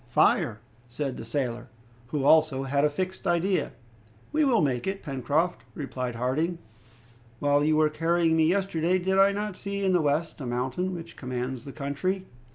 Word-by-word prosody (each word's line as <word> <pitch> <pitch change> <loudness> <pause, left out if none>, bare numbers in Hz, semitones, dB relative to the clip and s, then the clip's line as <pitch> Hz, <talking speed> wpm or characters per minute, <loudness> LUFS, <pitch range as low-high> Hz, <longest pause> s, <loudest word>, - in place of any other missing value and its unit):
"Fire," 110 0 +2 0.3
said 130 +2 -3
the - - -7
sailor, 120 0 -3 0.4
who, 140 +2 -2
also, 155 -3 +4
had 140 +1 +1
a 150 - +4
fixed 185 +5 -4
idea. 175 +3 +1 0.6
"We 310 +1 +2
will 255 -6 +4
make 130 -1 0
it, 195 0 -3
Pencroft," 145 +5 0
replied 130 -4 -4
Harding. 145 +9 0 0.8
"While 145 +1 +2
you 155 +1 +3
were 155 0 +4
carrying 165 +1 +2
me 160 -1 +4
yesterday, 185 -1 +1
did 190 +1 +1
I 195 +1 +6
not 205 -1 -3
see 200 +1 -3
in 190 - +3
the 180 - +4
west 150 +2 -1
a 130 - -4
mountain 130 +10 -2
which 170 -1 -8
commands 125 -1 -4
the 140 - -7
country?" 155 +8 -2
155 Hz, 170 wpm, -27 LUFS, 135-185 Hz, 0.8 s, I